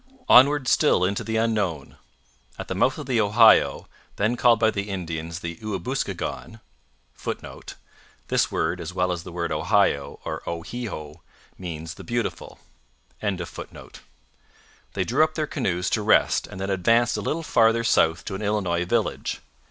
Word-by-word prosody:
Onward 135 +1 +6
still 125 - +3
into 100 +2 -1
the 110 0 -2
unknown! 105 -10 -1 0.6
At - - -7
the - - -1
mouth 110 +8 +1
of 150 - -6
the 125 -4 +1
Ohio 110 +2 +5 0.3
then 110 +4 +1
called 120 -2 +4
by 110 -1 +3
the 100 0 -4
Indians 85 -2 -5
the 85 -2 -5
Ouabouskigon 110 +2 -4 0.5
[Footnote: - - -7 0.5
This - - +1
word, - - -1
as 85 +2 -7
well 90 0 +1
as 85 -1 -3
the 90 - -10
word 85 0 -3
Ohio, 70 0 +1
or - - -4
O 85 -1 -4
he 120 +5 -5
ho, 75 -5 -8 0.3
means 80 -3 -6
'The - - -11
Beautiful.'] 120 -2 -4 0.6
they 95 -5 -8
drew 135 +6 +2
up 155 0 -1
their 155 - 0
canoes 95 - -2
to - - +1
rest - - +3
and 95 - -10
then 95 +1 -2
advanced 115 +6 +2
a 105 - -2
little 160 +10 -2
farther 115 -4 +3
south 80 -7 +2
to - - -5
an 95 - -5
Illinois 95 -5 0
village. 90 - -1
100 Hz, 160 wpm, -24 LUFS, 85-115 Hz, 0.6 s, Onward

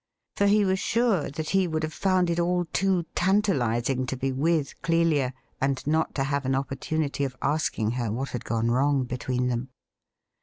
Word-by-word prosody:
For 200 - +2
he 205 0 +4
was 190 0 +1
sure 225 -5 +1
that 155 +2 -4
he 195 -2 +3
would 160 -1 -2
have 155 0 -3
found 185 -2 +2
it 170 - 0
aU 175 +1 +1
too 190 -3 +1
tantalizing 135 - +1
to 130 - -3
be 135 +1 -1
with 150 +2 0
Clelia 165 -6 +2 0.3
and 135 -1 0
not 160 +2 0
to 135 - +1
have 140 0 -1
an 130 0 0
opportunity 140 +2 -2
of 130 -2 -3
asking 140 -7 0
her 120 -3 -2
what 130 +5 -3
had 125 - -5
gone 115 0 0
wrong 135 +2 +2
between 125 0 -2
them. 125 +1 -2
145 Hz, 185 wpm, -26 LUFS, 130-175 Hz, 0.3 s, he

